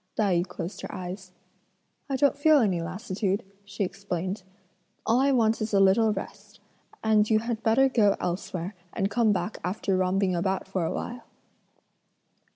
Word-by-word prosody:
Tai 205 -4 +2
yü 180 - -5
closed 180 +3 -6
her - - -6
eyes. 185 +1 -7 0.8
"I 270 - 0
don't 285 +1 +3
feel 305 +2 +5
any 195 -10 +2
lassitude," 190 +3 -2 0.2
she 200 0 -4
explained, 190 0 -3 0.6
"all 230 +3 +3
I 275 +1 +3
want 225 -3 +2
is 215 -1 -1
a - - +5
little 205 +3 +5
rest; 195 -2 -7 0.4
and 215 -1 +3
you 220 - +5
had 230 0 -2
better 230 +5 +4
go 215 -6 +3
elsewhere 180 +1 -3 0.2
and 195 +1 -1
come 225 0 +3
back 210 +2 -2
after 190 +1 -1
romping 185 0 +1
about 190 +3 -1
for 190 -2 -2
a 160 - -1
while." 240 0 -5
200 Hz, 165 wpm, -27 LUFS, 185-225 Hz, 0.8 s, feel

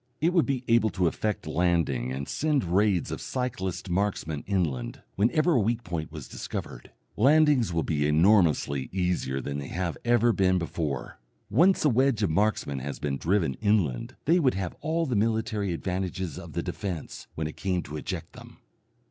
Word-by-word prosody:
It 170 +3 +2
would 170 -3 +3
be 135 -3 -1
able 115 -1 +4
to 90 - +2
effect 105 +5 -1
landing 80 -8 +1
and 70 +2 -4
send 150 -3 0
raids 95 0 +1
of - - -4
cyclist 110 -9 -3
marksmen 90 -5 -1
inland, 75 -12 -2
whenever 140 - +2
a 140 - +4
weak 115 +3 0
point 85 -3 -4
was 75 -4 -8
discovered. - - -6 0.3
Landings 140 - +4
will 85 -1 0
be 75 -2 0
enormously 80 -5 +3
easier 90 -8 -1
than 70 +1 -4
they 70 - -6
have 85 -2 -3
ever 120 -1 +3
been 95 -2 +3
before. 80 -8 -3 0.3
Once 175 - +4
a - - +6
wedge 130 -3 +2
of 95 - +1
marksmen 85 -7 0
has 70 +2 -5
been 70 -2 -2
driven 85 -5 +1
inland 95 - +1
they 170 +4 +4
would 130 - +2
have 95 -3 -3
all 165 +1 0
the 130 -5 -1
military 110 -2 0
advantages 90 -1 -3
of - - -10
the - - -2
defence 90 -6 -5
when 80 - -2
it 75 - -5
came 90 -2 -1
to 75 - -8
eject 75 - -5
them. - - -13
95 Hz, 175 wpm, -27 LUFS, 80-115 Hz, 0.3 s, a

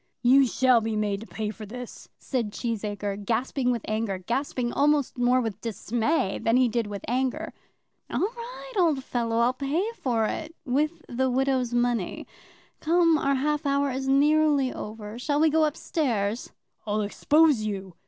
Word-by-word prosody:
"You 265 +2 +6
shall 250 -1 +3
be 225 0 -2
made 205 -1 -1
to 225 - -9
pay 215 -1 -4
for 215 -1 -10
this," 245 +2 -9
said 235 -6 -2
Cheesacre, 205 -3 -3
gasping 245 +4 0
with 235 -3 -1
anger; 215 -2 -1
gasping 240 +4 -2
almost 290 -1 +2
more 245 +1 +3
with 220 -4 -3
dismay 230 - -1
than 230 +2 +3
he 255 -1 +4
did 230 -1 -1
with 200 -2 -6
anger. 255 +2 -1 0.6
"All - - -1
right, 485 +4 -5
old 310 -7 +2
fellow; 230 -3 -1
I'll 235 +2 +3
pay 300 - -1
for 235 - 0
it, 320 +8 -4
with 305 +5 -1
the 260 +2 0
widow's 260 -1 +1
money. 240 -5 0 0.5
Come; 335 0 +3
our 275 0 +1
half 295 +3 0
hour 280 0 +1
is 265 +1 -3
nearly 290 -1 +3
over; 215 +1 -7
shall 290 +3 0
we 315 0 +4
go 315 0 +4
up 300 +1 -2
stairs?" 230 -8 -1 0.4
"I'll 210 +1 0
expose 295 +5 +3
you." 195 -3 -4
250 Hz, 165 wpm, -26 LUFS, 220-285 Hz, 0.6 s, You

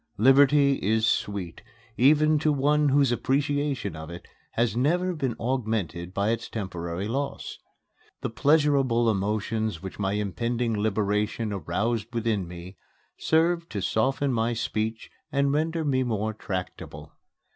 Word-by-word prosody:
Liberty 140 +4 +5
is 110 +2 +2
sweet, 100 -5 -2 0.3
even 155 +3 +4
to 155 0 +2
one 145 +1 +2
whose 135 -2 +3
appreciation 140 - -1
of 80 +1 -8
it 85 0 -9 0.3
has 115 -2 +1
never 175 +9 +1
been 135 -8 -2
augmented 110 - -2
by 100 +3 0
its 115 0 -3
temporary 90 -2 -4
loss. 140 +5 -4 0.6
The - - -3
pleasurable 135 -4 +3
emotions 105 -1 -2
which 95 - -8
my 95 -1 0
impending 115 +4 -1
liberation 105 +1 -1
aroused 105 +6 -1
within 110 -5 0
me 90 +2 -10 0.4
served 165 +1 +1
to 100 - -2
soften 135 +6 +1
my 115 +1 +1
speech 110 -1 -3 0.2
and 140 0 +1
render 160 +2 0
me 130 -3 +1
more 110 -3 -1
tractable. 95 -3 -6
115 Hz, 130 wpm, -26 LUFS, 105-140 Hz, 0.6 s, Liberty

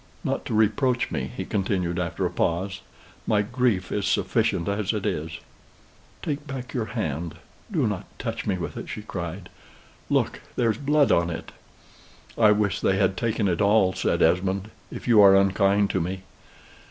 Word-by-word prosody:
"Not - - -2
to - - -2
reproach 120 +4 +2
me," - - -2
he - - -3
continued 95 -3 -1
after 85 -2 -2
a - - -1
pause. 95 +3 -1 0.5
"My 105 -1 +3
grief 115 -5 0
is 105 - -1
sufficient 85 - +1
as 100 +1 0
it 105 -3 -3
is." 80 +1 -2 0.9
"Take 150 -1 -3
back 130 -2 -6
your 120 -4 -1
hand 80 -4 -2 0.4
do - - +1
not - - -2
touch - - -4
me 95 -3 +1
with 85 - -5
it!" - - -7
she 105 - -6
cried. 90 -2 -6 0.6
"Look! - - 0
there's 115 -3 +1
blood 145 -3 +3
on 85 0 +3
it!" 80 - -6 0.8
"I 110 -2 +5
wish 105 -1 +1
they 95 - +2
had 95 -1 +2
taken 110 0 0
it 85 -1 0
all," 100 -2 +4
said - - +1
Esmond; 95 +5 +1 0.2
"if - - -8
you 115 -3 +7
are 100 -1 +8
unkind 100 +1 +3
to 95 - 0
me." 95 +3 -4
100 Hz, 170 wpm, -25 LUFS, 90-110 Hz, 0.9 s, are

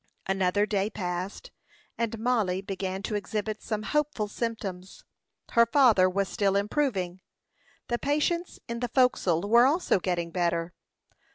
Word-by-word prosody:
Another 195 +1 +1
day 205 -1 0
passed, 185 - -5 0.4
and 230 -1 -2
Mollie 220 -6 0
began 190 0 -4
to 215 - -3
exhibit 210 +1 -3
some 215 -1 -3
hopeful 295 -6 0
symptoms. 205 -5 -5 0.5
Her 235 0 +5
father 230 -8 +5
was 195 +1 0
still 195 -1 0
improving. 200 -4 -1 0.7
The 240 0 -1
patients 305 +5 -1
in 235 0 -4
the 245 0 -2
forecastle 205 -8 +2
were 235 +4 +6
also 315 - +2
getting 175 -2 -2
better. 170 -1 -1
205 Hz, 130 wpm, -27 LUFS, 185-235 Hz, 0.7 s, were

